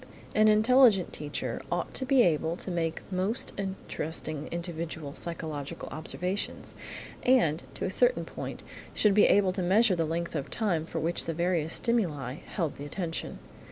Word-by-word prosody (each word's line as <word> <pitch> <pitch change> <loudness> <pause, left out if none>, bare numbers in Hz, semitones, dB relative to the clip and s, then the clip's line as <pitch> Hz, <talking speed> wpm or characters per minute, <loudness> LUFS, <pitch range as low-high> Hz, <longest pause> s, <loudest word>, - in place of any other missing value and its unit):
An 215 0 +5
intelligent 215 -2 +5
teacher 145 -5 -3
ought 175 0 -1
to 260 - -1
be 265 -2 +6
able 160 0 +1
to 185 - -3
make 165 -2 -2
most 190 +6 -1
interesting 160 -5 -4
individual 165 -4 -4
psychological 155 -4 -5
observations, 180 +5 -3 0.5
and, 210 - +3
to - - -3
a - - -1
certain - - +3
point, - - -7 0.3
should 210 -2 +4
be 210 - +6
able 195 -2 +4
to 185 - -2
measure 195 +3 +4
the 165 -1 +1
length 170 +2 -2
of 145 -4 -3
time 175 -8 0
for - - -5
which 170 +2 0
the 165 - -3
various 170 -2 0
stimuli 155 - 0
held 165 -6 -2
the 140 - -7
attention. 165 +2 -4
175 Hz, 155 wpm, -29 LUFS, 160-205 Hz, 0.5 s, be